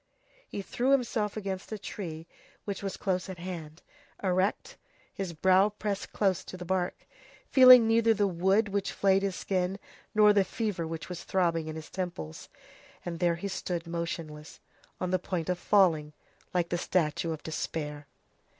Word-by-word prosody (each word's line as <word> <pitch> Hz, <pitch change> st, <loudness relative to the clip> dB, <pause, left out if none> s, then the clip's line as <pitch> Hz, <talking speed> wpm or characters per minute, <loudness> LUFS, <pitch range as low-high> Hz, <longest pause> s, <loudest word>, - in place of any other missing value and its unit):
He 200 Hz, -, -5 dB
threw 245 Hz, +6 st, -1 dB
himself 225 Hz, -5 st, 0 dB
against 195 Hz, -2 st, -4 dB
a 215 Hz, -, -3 dB
tree 165 Hz, -6 st, -6 dB, 0.4 s
which 200 Hz, -2 st, -4 dB
was 195 Hz, -1 st, -4 dB
close 185 Hz, -1 st, -1 dB
at 185 Hz, -, -6 dB
hand, 170 Hz, -3 st, -7 dB, 0.4 s
erect, 195 Hz, -, 0 dB, 0.4 s
his 195 Hz, -3 st, -4 dB
brow 185 Hz, +5 st, +4 dB
pressed 205 Hz, -1 st, -4 dB
close 190 Hz, -4 st, +1 dB
to 185 Hz, -, -8 dB
the 180 Hz, -, -7 dB
bark, 180 Hz, 0 st, -2 dB, 0.5 s
feeling 255 Hz, -3 st, +9 dB
neither 225 Hz, 0 st, +4 dB
the 210 Hz, -2 st, +2 dB
wood 190 Hz, +4 st, +2 dB
which 200 Hz, 0 st, -1 dB
flayed 195 Hz, -1 st, +3 dB
his 195 Hz, -2 st, -1 dB
skin, 185 Hz, 0 st, -1 dB, 0.4 s
nor 210 Hz, -1 st, +7 dB
the 200 Hz, -1 st, +4 dB
fever 195 Hz, -5 st, -3 dB
which 165 Hz, 0 st, -6 dB
was 180 Hz, -2 st, -6 dB
throbbing 170 Hz, -4 st, 0 dB
in 155 Hz, -, -5 dB
his 160 Hz, -1 st, -9 dB
temples, 175 Hz, -, -5 dB, 0.6 s
and 170 Hz, -2 st, -4 dB
there 175 Hz, -1 st, +2 dB
he 175 Hz, +4 st, -4 dB
stood 180 Hz, -3 st, -3 dB
motionless, 165 Hz, -2 st, -5 dB, 0.4 s
on 180 Hz, -1 st, -2 dB
the 185 Hz, -, +2 dB
point 180 Hz, -2 st, -3 dB
of 180 Hz, -1 st, 0 dB
falling, 165 Hz, -7 st, +3 dB, 0.4 s
like 175 Hz, -2 st, 0 dB
the 175 Hz, -, -1 dB
statue 165 Hz, -2 st, 0 dB
of 155 Hz, -2 st, -6 dB
despair. 150 Hz, -2 st, -4 dB
185 Hz, 165 wpm, -29 LUFS, 170-200 Hz, 0.6 s, feeling